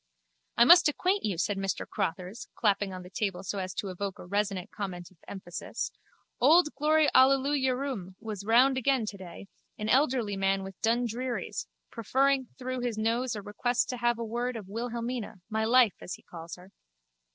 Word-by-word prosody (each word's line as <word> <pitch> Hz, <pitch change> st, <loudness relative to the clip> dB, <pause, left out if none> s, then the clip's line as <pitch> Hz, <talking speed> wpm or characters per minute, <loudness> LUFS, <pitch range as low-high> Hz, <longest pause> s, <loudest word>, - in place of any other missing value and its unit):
I 235 Hz, -, +7 dB
must 340 Hz, +4 st, +8 dB
acquaint 370 Hz, +7 st, 0 dB
you, 200 Hz, -5 st, -1 dB
said 195 Hz, +4 st, 0 dB
Mr 195 Hz, 0 st, -2 dB
Crotthers, 180 Hz, +6 st, -4 dB
clapping 205 Hz, -3 st, +1 dB
on 185 Hz, -1 st, -7 dB
the 180 Hz, -, -11 dB
table 195 Hz, -3 st, -2 dB
so 200 Hz, +1 st, -3 dB
as 185 Hz, 0 st, -3 dB
to 200 Hz, -, -3 dB
evoke 195 Hz, +1 st, -4 dB
a -, -, -10 dB
resonant 200 Hz, 0 st, -2 dB
comment 185 Hz, -3 st, -6 dB
of 185 Hz, -, -23 dB
emphasis, 175 Hz, -3 st, -5 dB, 0.5 s
old 300 Hz, +4 st, +5 dB
Glory 305 Hz, +2 st, +3 dB
Allelujurum 265 Hz, -6 st, +2 dB
was 215 Hz, -3 st, -6 dB
round 255 Hz, +5 st, +4 dB
again 260 Hz, -2 st, +2 dB
today, 195 Hz, -2 st, -8 dB, 0.3 s
an 215 Hz, 0 st, -3 dB
elderly 250 Hz, -6 st, +2 dB
man 195 Hz, 0 st, +1 dB
with 190 Hz, -1 st, -10 dB
dundrearies, 240 Hz, +2 st, -1 dB, 0.2 s
preferring 265 Hz, +3 st, +1 dB
through 255 Hz, -1 st, -4 dB
his 245 Hz, -3 st, -2 dB
nose 230 Hz, +3 st, 0 dB
a 205 Hz, -, -6 dB
request 240 Hz, +4 st, 0 dB
to 250 Hz, -, -3 dB
have 240 Hz, -1 st, +1 dB
word 235 Hz, +2 st, -3 dB
of 210 Hz, -4 st, -7 dB
Wilhelmina, 235 Hz, 0 st, -4 dB
my 220 Hz, 0 st, 0 dB
life, 235 Hz, -3 st, +5 dB
as 180 Hz, -, -5 dB
he -, -, -19 dB
calls 165 Hz, -1 st, -9 dB
her. 180 Hz, +2 st, -16 dB
225 Hz, 170 wpm, -29 LUFS, 195-255 Hz, 0.5 s, must